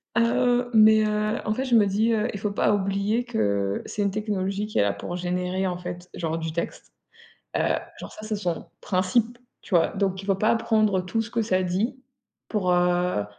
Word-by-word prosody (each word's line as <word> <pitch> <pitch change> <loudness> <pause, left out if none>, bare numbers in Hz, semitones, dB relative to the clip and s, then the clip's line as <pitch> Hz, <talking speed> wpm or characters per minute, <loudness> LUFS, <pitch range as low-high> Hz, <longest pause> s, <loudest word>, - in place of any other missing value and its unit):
Heu, 245 +1 +2
mais 220 0 +7
heu, 215 +1 0
en 215 - +1
fait, 260 +4 -2
je 255 - -2
me 210 -2 +5
dis, 215 +4 +2
heu: 215 +1 +1
«Il 200 - -5
faut 210 0 -2
pas 200 - +2
oublier 200 +3 0
que 100 - 0
c'est 205 - -2
une 200 - +1
technologie 200 -1 -2
qui 215 - -5
est - - +5
là 100 - +1
pour 170 +12 -6
générer, 180 +1 -2
en 180 -1 -1
fait, 175 0 -7
genre, 165 -1 -2
du 165 -1 -3
texte», 170 +1 -5 0.6
heu, - - 0 0.4
genre, - - -9
ça, - - -11
c'est 215 -1 -2
son 175 -5 -3 0.2
principe, 215 +6 +1 0.2
tu 185 - -5
vois, 165 - +5
donc 190 -2 -1
il - - -10
faut 195 - +3
pas 215 +4 +2
prendre 215 -4 +2
tout 225 +5 -1
ce 225 - -9
que 230 - 0
ça 185 -4 +1
dit, 195 +8 -1 0.5
pour, 195 -5 0
heu, 180 - +2
200 Hz, 210 wpm, -25 LUFS, 180-220 Hz, 0.6 s, mais